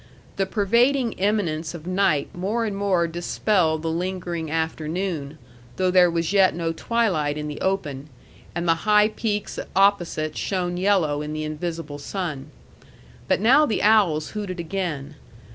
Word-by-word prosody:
The 195 -1 0
pervading 235 +6 +2
imminence 180 -6 -1
of 165 -1 -9
night 180 -6 +1
more 210 +6 -1
and 210 -2 -3
more 195 -4 +1
dispelled 170 -1 0
the 165 - -1
lingering 175 -2 -3
afternoon, 160 -1 -3 0.4
though 185 -1 +1
there 180 -1 +6
was 170 +2 -1
yet 190 -4 +4
no 165 -1 -1
twilight 165 -7 0
in 150 0 -4
the 150 - -6
open, 150 -7 -2 0.5
and 170 0 -2
the 165 - +5 0.2
high 210 0 +6
peaks 210 -2 -3 0.2
opposite 175 -6 +2
shone 180 -2 -2
yellow 180 -6 +2
in 150 0 -5
the 155 0 -3
invisible 155 -1 -5
sun. 155 -4 -5 0.8
But - - +1
now 270 +7 +5
the 220 - -1
owls 200 -8 +3
hooted 200 -4 -5
again. 160 -5 -4
175 Hz, 145 wpm, -23 LUFS, 155-200 Hz, 0.8 s, there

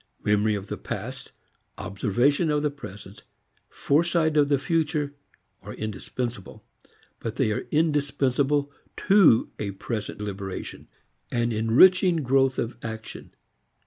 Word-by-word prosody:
Memory 105 +1 +2
of 100 -1 -5
the - - -6
past, - - -6 0.5
observation 125 - +1
of 150 0 +1
the 150 - +1
present, 105 -8 -11 0.5
foresight 160 +1 +1
of 145 -1 +4
the 140 - +3
future 150 0 -1 0.5
are - - -9
indispensable. 110 0 -5 0.5
But 115 -1 -5
they 120 -6 +1
are 105 - -3
indispensable 145 -2 +1 0.4
to 195 - +5
a 105 - -2
present 100 +2 -5
liberation, 100 -2 -6 0.4
an 120 -1 0
enriching 160 - +4
growth 135 0 +2
of 115 0 -3
action. 110 -1 -8
130 Hz, 115 wpm, -25 LUFS, 110-150 Hz, 0.5 s, to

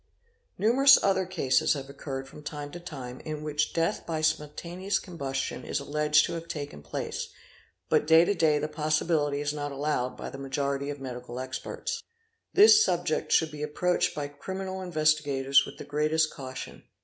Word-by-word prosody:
Numerous 270 +5 +7
other 190 -2 +2
cases 155 -8 +2
have 135 -2 -5
occurred 135 -1 -6
from 150 - -12
time 145 -1 -6
_to 175 +2 -9
time 130 -6 -7
in 155 -1 -6
which 150 0 0
death 165 0 0
by 160 -2 -3
spontaneous 170 +5 -1
combustion 140 -7 -4
is - - -2
alleged 150 +1 +3
to - - -4
have 165 0 -5
taken 145 - -6
place, 75 - -4 0.6
but 150 +6 +2
to 165 +4 +6
day 160 -5 +3
the 150 +1 -1
possibility 155 -1 0
is 145 0 -1
not 145 -1 -4
allowed 140 -3 -1
by - - -6
the 135 - -8
majority 140 +1 -2
of 145 -1 -5
medical 125 -2 -6
experts. 460 - -4 0.5
This 425 +1 +8
subject - - 0
should 160 -1 +3
be 150 -1 -8
approached 175 +4 0
by 145 -1 -3
criminal 190 +6 -5
investi 155 -4 +2
gators 140 -1 +3
with - - -10
the - - -7
greatest 155 +2 +1
caution. 130 -3 -8
150 Hz, 170 wpm, -28 LUFS, 140-170 Hz, 0.6 s, This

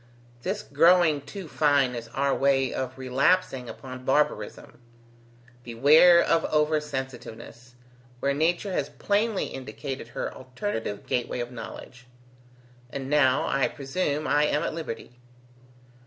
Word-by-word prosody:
This 195 - -3
growing 160 0 +4
too 190 +5 -8
fine 145 -4 +2
is 115 -1 -6
our 135 +4 0
way 135 -2 +2
of 130 0 -4
relapsing 130 +1 +1
upon 130 -1 -9
barbarism. 125 -4 -1 0.8
Beware 145 +9 +6
of 165 - +2
over 150 0 +2
sensitiveness, 125 -3 -8 0.4
where 140 +2 +1
nature 175 +6 0
has 145 -4 -1
plainly 205 - 0
indicated 135 -1 -7
her 120 - -5
alternative 130 - -5
gateway 125 0 -2
of 120 0 -4
knowledge. 125 +1 -10 0.8
And 135 +1 -6
now, 145 -2 +3
I 135 -1 +1
presume, 145 +2 -2
I 150 0 +3
am 150 0 0
at - - -2
liberty." 125 -6 -7
140 Hz, 125 wpm, -26 LUFS, 125-155 Hz, 0.8 s, Beware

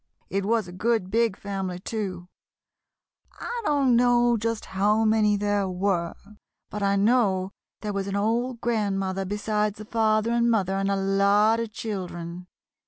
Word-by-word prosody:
"It 195 0 -1
was 225 -3 +1
a - - -9
good 200 0 -1
big 230 -3 +1
family, 195 -3 -4
too; 185 -3 -5 1.1
I 480 0 -4
don't 280 -4 +3
know 240 0 +4
just 230 0 -2
how 210 +3 +1
many 215 -1 +3
there 205 -1 0
were, 180 -2 -1 0.6
but 210 - -5
I 200 0 +2
know 200 -3 +2 0.3
there 210 -1 -3
was 195 0 -2
an 200 - -3
old 235 +4 -1
grandmother 195 -4 -1
besides 210 +1 -1
the 215 - -9
father 220 0 +1
and 235 0 +2
mother 195 -5 +1
and 195 0 0
a 200 - +1
lot 200 +3 +3
of 230 -2 -3
children. 180 -5 -6
205 Hz, 155 wpm, -25 LUFS, 195-225 Hz, 1.1 s, know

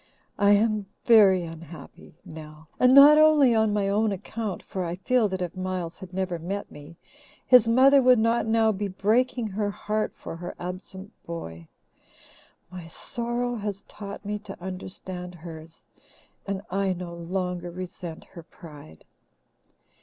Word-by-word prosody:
I 205 0 +5
am 210 -1 +1 0.2
very 200 -6 +6
unhappy, 165 -1 -11
Nell, 155 0 -11
and 250 - +5
not 285 +3 +9
only 305 -5 +5
on 220 -1 +2
my 205 -1 0
own 210 +2 +1
account, 205 +1 -5
for 185 - -5
I 170 0 -3
feel 225 +3 +1
that 190 -1 -3
if 175 0 -6
Miles 185 -2 -4
had 190 -2 -10
never 185 -2 -3
met 195 +5 -5
me, 150 +3 -13 0.5
his 250 -3 +6
mother 270 +4 +6
would 255 -1 +5
not 230 +1 +1
now 220 0 +3
be 205 0 -3
breaking 230 +6 0
her 205 +1 -2
heart 215 +1 -2
for - - -8
her 175 +1 -7
absent 185 +2 -8 0.2
boy. 85 - -7 1.0
My 180 -2 -9
sorrow 240 +7 -3
has 205 -2 -5
taught 200 0 -9
me 210 +1 -3
to 205 -2 -10
understand 185 -1 -7
hers, 160 -1 -11 0.6
and 195 0 -3
I 195 0 0
no 175 -1 -7
longer 175 +1 -4
resent 175 -2 -8
her 170 - -13
pride. 150 - -14
190 Hz, 150 wpm, -25 LUFS, 175-220 Hz, 1.0 s, not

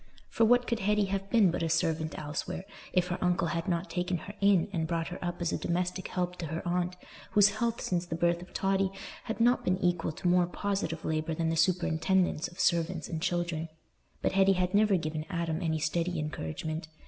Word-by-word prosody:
For 230 - +3
what 245 +2 +4
could 235 -2 -1
Hetty 210 0 +2
have 195 0 -2
been 215 -7 +5
but - - -2
a 165 - 0
servant 160 -1 0
elsewhere, 150 +5 -4 0.3
if 180 0 +1
her 175 - -2
uncle 180 -1 +1
had 165 0 -2
not 175 0 0
taken 180 0 -1
her 185 +5 -9
in 195 -4 +4
and 160 -2 -1
brought 165 -1 -1
her 180 - -7
up 175 0 -3
as 170 - 0
a - - -1
domestic 180 +2 -1
help 180 -1 -2
to 165 - -4
her 165 +3 -4
aunt, 180 +1 0 0.4
whose 205 0 +7
health 235 0 0
since 175 -1 -1
the 165 - -3
birth 170 +1 +1
of 180 - -12
Totty 195 0 +1 0.4
had 225 - -4
not 240 +2 +4
been 185 0 +1
equal 175 -3 0
to 180 - -3
more 175 0 +4
positive 180 -4 -2
labour 155 0 -1
than 165 0 0
the 165 - 0
superintendence 175 0 +2
of 175 - -15
servants 170 -1 +1
and 160 -1 -3
children? 175 -2 -1 0.5
But - - +2
Hetty 195 0 +5
had 180 -1 0
never 205 -1 +4
given 155 -2 -3
Adam 170 -2 -2
any 160 -2 0
steady 170 +3 -1
encouragement. 155 - -4
175 Hz, 210 wpm, -30 LUFS, 165-190 Hz, 0.5 s, whose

